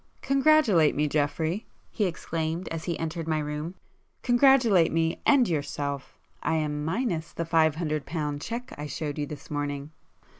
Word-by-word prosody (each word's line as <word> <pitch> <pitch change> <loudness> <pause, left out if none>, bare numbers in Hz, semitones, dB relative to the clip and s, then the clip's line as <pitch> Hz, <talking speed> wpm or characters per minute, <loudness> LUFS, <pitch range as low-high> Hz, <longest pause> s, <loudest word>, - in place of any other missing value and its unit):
"Congratulate 275 - +4
me 150 +1 +1
Geoffrey!" 155 +6 -1 0.2
he 210 - 0
exclaimed 165 -1 -3
as 165 -1 -5
he 170 -3 -2
entered 165 0 -4
my 160 -1 +1
room—"Congratulate 190 - +2
me, 165 0 0
and 270 -5 +5
yourself! 145 -3 -3 0.2
I 160 - 0
am 150 -1 -1
minus 165 -1 -1
the 170 - -3
five 160 -2 +3
hundred 155 -3 -2
pound 150 -3 -3
cheque 235 +6 -5
I 150 - -4
showed 150 +1 -4
you 145 - -2
this 145 0 -9
morning!" 145 0 -3
160 Hz, 150 wpm, -27 LUFS, 150-185 Hz, 0.2 s, and